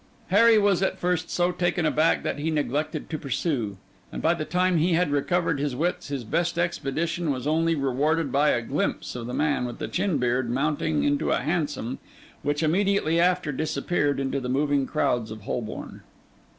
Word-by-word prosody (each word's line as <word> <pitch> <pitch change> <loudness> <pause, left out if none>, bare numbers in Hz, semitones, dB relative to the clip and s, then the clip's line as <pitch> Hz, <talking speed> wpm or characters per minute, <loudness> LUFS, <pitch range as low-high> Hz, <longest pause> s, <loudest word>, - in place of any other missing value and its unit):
Harry 225 +4 +6
was 200 -3 +3
at 190 - 0
first 180 -1 -1
so 175 0 +1
taken 175 -1 0
aback 155 +1 +2
that - - -2
he 155 +2 -1
neglected 150 0 -1
to 155 - -4
pursue; 130 - -2 0.3
and - - -5
by 165 - +3
the 165 -3 -3
time 180 +2 +1
he 170 +3 +2
had 165 -2 +2
recovered 165 +1 +1
his 140 -3 -1
wits, 170 +7 -1
his 140 -3 -4
best 170 +9 -1
expedition 170 0 -1
was 130 -2 -2
only 165 +2 +2
rewarded 145 +2 0
by 145 +3 +3
a 120 - +1
glimpse - - -2
of 120 -1 -5
the 125 - -5
man 150 -4 +1
with 120 -1 -5
the - - -4
chin 185 -4 0
beard 125 -1 0
mounting 150 +4 0
into 145 0 +1
a - - +1
hansom, 150 -6 -2 0.4
which 145 +2 -1
immediately 175 0 +2
after 180 -3 +2
disappeared 150 0 -1
into 135 0 -1
the 125 -1 -5
moving 140 0 +1
crowds 120 -3 0
of 110 0 -8
Holborn. 110 +2 -5
155 Hz, 185 wpm, -25 LUFS, 135-175 Hz, 0.4 s, Harry